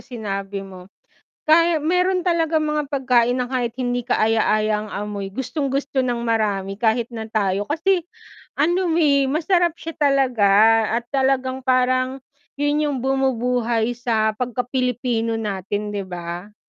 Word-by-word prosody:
sinabi 200 -4 -5
mo. 185 -1 -12 0.6
Kaya 330 +1 +4
meron 360 +4 +1
talagang 325 -2 +1
mga 300 -1 -1
pagkain 250 -3 +2
na 250 - -1
kahit 245 -2 -1
hindi 245 -1 -1
kaaya-aya 215 -2 +1
ang 215 - -9
amoy 205 -1 -4
gustong 265 +5 -3
gusto 275 0 -1
ng 245 -1 -1
marami 200 -4 0
kahit 230 +1 +1
na 225 -2 -6
tayo, 200 -2 0
kasi 345 +3 +1 0.6
ano 345 +4 +2
eh 280 -4 +3
masarap 345 +2 +1
siya 330 0 -7
talaga 265 -8 +3 0.5
at 235 - -36
talagang 265 -1 0
parang 255 +1 +2 0.4
yun 290 +1 0
yung 290 -2 -1
bumubuhay 245 -3 0
sa 225 -3 0
pagka-Pilipino 250 -2 -1
natin 205 -1 -3
'di 200 - -2
ba? 175 +3 -7
250 Hz, 135 wpm, -21 LUFS, 220-285 Hz, 0.6 s, Kaya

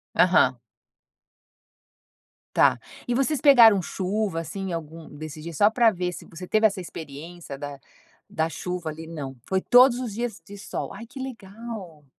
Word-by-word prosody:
Aham. - - +4 2.0
Tá, - - +5 0.3
e 245 - 0
vocês 275 +3 +1
pegaram 230 -9 +7
chuva 190 0 -2
assim, 190 +3 -5
algum 165 0 -7
desses 155 +1 -8
dias, 165 0 -7
só 205 +5 +5
pra 235 0 +4
ver 180 -3 -2
se - - -9
você 170 +2 -9
teve 215 +3 +3
essa 195 -2 -5
experiência 160 -1 -9
da 145 -1 -7 0.5
da 160 0 +1
chuva 180 0 -4
ali 160 +1 -8
não. 145 -5 -6
Foi 190 - +1
todos 245 +4 +6
os 245 -5 -4
dias 235 -1 -4
de 205 - -10
sol, 200 - -5
ai 220 +4 -9
que 255 +4 -11
legal. 215 - -8
185 Hz, 155 wpm, -25 LUFS, 160-225 Hz, 2.0 s, pegaram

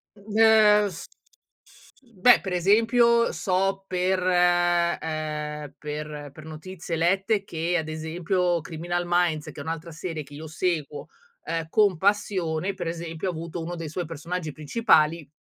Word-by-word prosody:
De 210 +2 -2 0.5
f 170 -3 -9 0.6
f - - -22
mmhm, 235 -8 -23
beh 245 - +7
per 190 -2 -4
esempio 230 +5 +4
so 195 0 0
per, 185 +1 0
ehm, 165 -4 0
per 150 -1 -6
per 155 +2 -12
notizie 165 +2 -6
lette 195 +5 +1
che 170 0 -1
ad 160 -2 -3
esempio 170 +3 -1
Criminal 175 +3 -3
Minds 175 -3 +1
che - - -9
è - - -4
un'altra 165 +2 -5
serie 160 -1 -5
chi 145 - -16
io 155 +2 -8
seguo, 155 -2 -2 0.4
ehm, 165 -1 -3
con 200 -2 +3
passione, 190 -2 0
per 175 - -5
esempio 165 +1 -4
ha - - -1
avuto 165 +1 -6
uno 170 +2 -5
dei 165 -2 -6
suoi 175 +3 -4
personaggi 165 +1 -5
principali 155 - +2
170 Hz, 150 wpm, -25 LUFS, 155-185 Hz, 0.6 s, beh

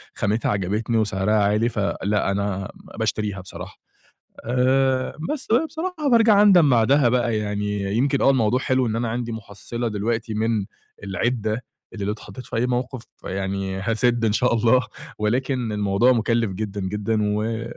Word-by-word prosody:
خامتها 105 +2 0
عجبتني 105 +4 -1
وسِعرها 105 -1 0
عالي، 105 +2 +2
فلأ 100 -1 -1
أنا 100 -1 -2 0.3
باشتريها 105 -3 -1
بصراحة 95 - -9 0.7
آآ، 130 +2 +1 0.2
بس 275 - -5
بقى 250 +8 +4
بصراحة 320 -1 -3
بارجَع 225 -3 +6
أندَم 180 -8 +6
بعدها 125 +2 +4
بقى، 120 -3 +1
يعني 105 -1 -2
يمكن 140 +2 +1
آه - - +5
الموضوع 125 -1 +2
حلو 130 -2 +1
إن 110 - -2
أنا 115 0 -1
عندي 120 0 -3
مُحصِّلة 110 +2 -5
دلوقتي 110 +2 -2
من 110 -2 0 0.4
العدّة 110 +3 -1 0.3
اللي 100 -3 -4
لو 105 - 0
اتحطّيت 105 +3 -9
في - - -7
أي 120 +2 +1
موقِف 125 0 -2 0.2
يعني 95 0 -3
هاسِد 115 +3 +1
إن 105 - +2
شاء 125 +1 +2
الله 115 +1 +3 0.3
ولكن 125 +1 0
الموضوع 105 +4 +2
مُكلّف 115 -2 +1
جدًا، 100 0 -4
جدًا 105 +3 -1 0.2
و 110 +1 -2
115 Hz, 150 wpm, -23 LUFS, 105-125 Hz, 0.7 s, بارجَع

